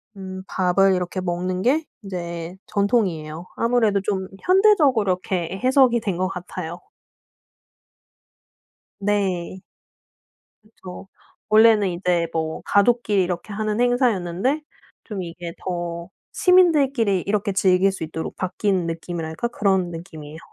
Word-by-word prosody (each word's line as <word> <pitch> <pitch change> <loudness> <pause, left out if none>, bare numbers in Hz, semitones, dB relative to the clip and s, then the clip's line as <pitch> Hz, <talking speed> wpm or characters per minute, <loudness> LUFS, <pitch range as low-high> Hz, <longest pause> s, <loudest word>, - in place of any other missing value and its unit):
음 190 -1 -7
밥을 190 +1 +2
이렇게 180 +1 -3
먹는 180 +1 -2
게 290 +9 +2 0.2
이제 170 -2 -5
전통이에요. 180 -6 -1
아무래도 230 -4 +2
좀 190 -2 -2
현대적으로 365 - +4
이렇게 185 0 -3
해석이 255 -2 +4
된 195 -5 -3
것 185 0 0
같아요. 175 -2 -6 2.2
네. 190 -3 -1 1.0
그쵸. 195 -3 -11 0.4
원래는 215 -2 +5
이제 175 -1 0
뭐 160 -1 -2
가족끼리 205 -2 +3
이렇게 180 +3 -4
하는 215 +1 -2
행사였는데 245 - +1 0.4
좀 205 -5 -5
이게 170 0 -7
더 175 -2 -4 0.2
시민들끼리 280 - +3
이렇게 205 0 0
즐길 190 0 +3
수 190 - -6
있도록 160 0 -5
바뀐 185 -1 -1
느낌이랄까? 165 +3 -4
그런 190 -6 +1
느낌이에요. 160 -3 -9
190 Hz, 270 characters per minute, -22 LUFS, 175-215 Hz, 2.2 s, 원래는